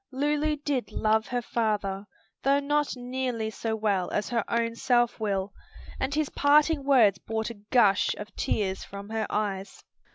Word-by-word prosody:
Lulu 295 +3 0
did 285 -5 -2
love 220 +1 +1
her 245 0 -2
father 205 -4 -1 0.3
though 275 +1 +3
not 295 0 0
nearly 245 -3 -3
so 220 +1 -3
well 205 -4 0
as 210 - -2
her 235 -3 0
own 230 0 0
self 240 0 +1
will 200 -2 -1 0.5
and 265 +2 -1
his 305 -2 0
parting 295 +1 +3
words 235 -9 +4
brought 220 +1 -3
a 210 -3 -13
gush 210 -6 +4
of 210 +1 -9
tears 190 -3 -1
from 200 +1 -9
her 220 -1 -2
eyes. 200 -2 -3
230 Hz, 160 wpm, -27 LUFS, 210-270 Hz, 0.5 s, words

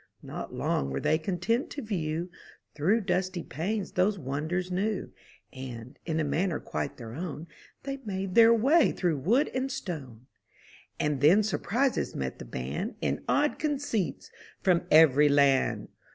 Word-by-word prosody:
Not - - -6
long 70 - -1
were 70 0 -2
they 155 - +2
content 195 - -1
to 285 - -6
view 170 -4 -3 0.4
Through 190 +10 +2
dusty 180 -2 -1
panes 190 - -3
those 195 +3 +2
wonders 160 +6 -3
new; 195 +2 -1 0.4
And, 130 -1 -8
in 160 -1 0
a - - +1
manner 155 +4 0
quite 75 -1 -4
their 115 -2 -8
own. 160 +1 -5 0.4
They 275 0 -4
made 195 -7 -4
their 230 +1 +7
way 270 +9 +4
through 170 -6 0
wood 235 - +2
and 260 +1 -1
stone. 130 - -6 0.7
And 150 -3 0
then 180 +9 +6
surprises 240 +6 0
met 65 -1 -4
the - - -7
band. 65 +4 -4
In - - -1
odd 295 +1 +2
conceits 290 - -2 0.3
from 180 -2 +2
every 150 -2 +6
land. 140 -2 +3
180 Hz, 150 wpm, -28 LUFS, 145-215 Hz, 0.7 s, their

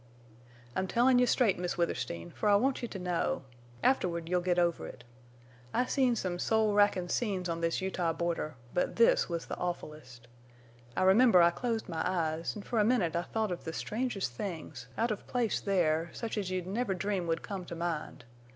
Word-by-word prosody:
"I'm 190 - 0
tellin' 245 +4 +4
you 250 - +4
straight, 225 -8 +3
Miss 180 0 -2
Withersteen, 120 - -2
fer 215 - -2
I 205 - +6
want 260 +6 +2
you 240 - -2
to 205 - -7
know. 180 -5 -1 0.4
Afterward 170 -10 +1
you'll 180 +1 +1
git 175 0 +1
over 175 -1 +1
it. - - -11 0.7
I've 250 +1 +1
seen 255 -3 +3
some 180 -5 -2
soul 220 0 +2
rackin' 205 -3 +3
scenes 190 -3 -1
on 165 -1 -3
this 165 +1 0
Utah 185 -3 0
border, 165 -2 -2 0.2
but 180 - 0
this 230 -4 +4
was 170 -1 -3
the - - -5
awfulest. 150 -8 -6 0.7
I - - +3
remember 190 -1 +6
I 170 - +5
closed 230 +3 -2
my 165 -3 -3
eyes, 165 -2 -1
an' 210 - -7
fer 230 +1 -1
a - - +5
minute 210 -8 +2
I 170 - +2
thought 220 +2 -2
of 175 - -4
the 160 - -5
strangest 215 - -2
things, 155 - -6
out 230 +1 +1
of 210 - -5
place 240 -3 0
there, 170 -4 +1
such 230 -2 -4
as 200 -4 -2
you'd 185 -1 -2
never 200 +1 -1
dream 190 -1 -2
would 165 -1 -1
come 195 -3 -5
to 170 - -7
mind. 165 -7 -4
180 Hz, 195 wpm, -31 LUFS, 170-215 Hz, 0.7 s, I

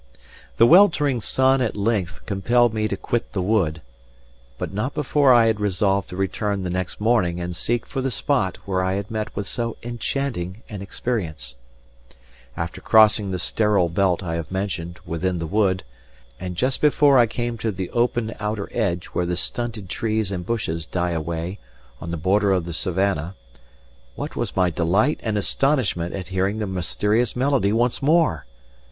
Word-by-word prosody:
The 115 - +7
weltering 150 - +5
sun 130 +3 +2
at 120 - -1
length 100 -4 -1
compelled 120 +4 +2
me 110 -1 0
to 100 - -3
quit 120 +4 -2
the 95 - -1
wood, 90 -7 +1 0.7
but - - -5
not 110 +8 -2
before 145 -2 +3
I 120 -2 +6
had 110 -1 +1
resolved 100 -1 +1
to 90 - -7
return 95 +1 -1
the 90 - -3
next 90 0 -3
morning 105 -6 +2
and 90 0 -4
seek 120 +8 -1
for 135 - -4
the 135 - 0
spot 120 -5 0
where 95 -1 0
I 95 0 0
had 100 +1 -4
met 110 -1 -3
with 100 - -3
so 115 +1 -3
enchanting 120 -5 -3
an 105 -4 -6
experience. 85 - -4 1.0
After 85 -1 -4
crossing 110 -2 +5
the 95 - -2
sterile 105 -2 +1
belt 95 +1 +1
I 85 -2 -3
have 85 - -5
mentioned 85 -3 -3
within 90 +2 -1
the 85 - -3
wood, 95 0 +1 0.6
and 90 -1 -5
just 130 +7 -1
before 145 -2 +5
I 120 - +5
came 120 +1 -3
to 115 - -1
the 95 -2 -5
open 120 -2 0
outer 105 -1 -3
edge 95 -7 -1
where 90 - 0
the 90 0 -1
stunted 115 -2 -4
trees 110 +1 -1
and 90 -2 -3
bushes 85 -7 -2
die 90 0 -1
away 85 +3 -3 0.4
on 85 - -7
the 85 - -3
border 100 +5 +2
of 90 -3 0
the 85 - -5
savannah, 95 0 -1 0.8
what - - -5
was - - -3
my 90 -2 +3
delight 95 - +1
and 110 -2 -1
astonishment 105 - 0
at 95 -1 -6
hearing 95 +2 0
the 110 - -2
mysterious 105 +5 0
melody 130 -5 +2
once 120 +2 +1
more! 145 - +2
100 Hz, 175 wpm, -23 LUFS, 90-120 Hz, 1.0 s, The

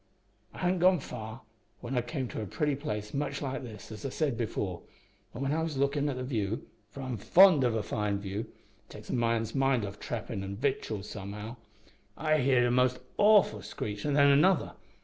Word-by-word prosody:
"I - - -14
hadn't 180 0 +1
gone 180 0 +5
far 110 -2 -7 0.4
when 125 +2 -5
I 125 - +2
came 130 +2 -4
to - - -5
a 105 - -4
place - - -13 0.5
pretty - - -3
much 140 -1 -2
like 135 0 -3
this, 110 -4 -10
as 105 - -8
I 135 - -2
said 140 -1 -1
before, 105 -6 -3 0.5
and 120 - -5
when 135 - 0
I 160 - 0
was 160 -3 -3
lookin' 140 +1 +1
at 135 - -2
the 125 - -4
view 110 -5 -2 0.2
for 135 - -9
I'm 130 -3 -3
fond 175 - +6
of 120 -2 +2
a 110 - -1
fine 105 -1 -1
view, 100 0 -4
it - - -30
takes - - -9
a - - -2
man's 115 -2 0
mind 135 -5 +2
off 100 +1 -8
trappin' 110 -4 -4
an' 95 0 -5
victuals 110 -4 -2
somehow 105 +4 -7 0.6
I 155 -1 +2
heerd 130 -2 +4
a 120 - +2
most 125 0 +3 0.2
awful 205 - +5
screech, 105 0 -5
an' 145 - 0
then 140 -1 +6
another. 175 +6 +4
125 Hz, 205 wpm, -30 LUFS, 110-140 Hz, 0.6 s, fond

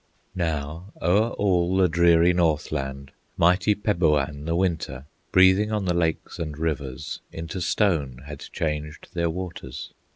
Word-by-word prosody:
Now, 80 +1 -3
o'er 100 +7 +3
all 90 -2 +1
the 95 -1 +5
dreary 85 +1 +4
North 80 -4 +1
land, 70 -2 -4 0.3
Mighty 90 +5 +4
Peboan, 75 -8 +1
the 80 +1 0
Winter, 85 -7 -1 0.3
Breathing 95 +3 +5
on 105 -2 -1
the 90 - +1
lakes 80 -2 -1
and 75 -3 -4
rivers, 75 -3 -3
Into 80 +3 -5
stone 80 - 0
had 75 -1 -8
changed 75 -1 -4
their 85 -1 0
waters. 80 -7 -6
85 Hz, 135 wpm, -25 LUFS, 75-90 Hz, 0.3 s, the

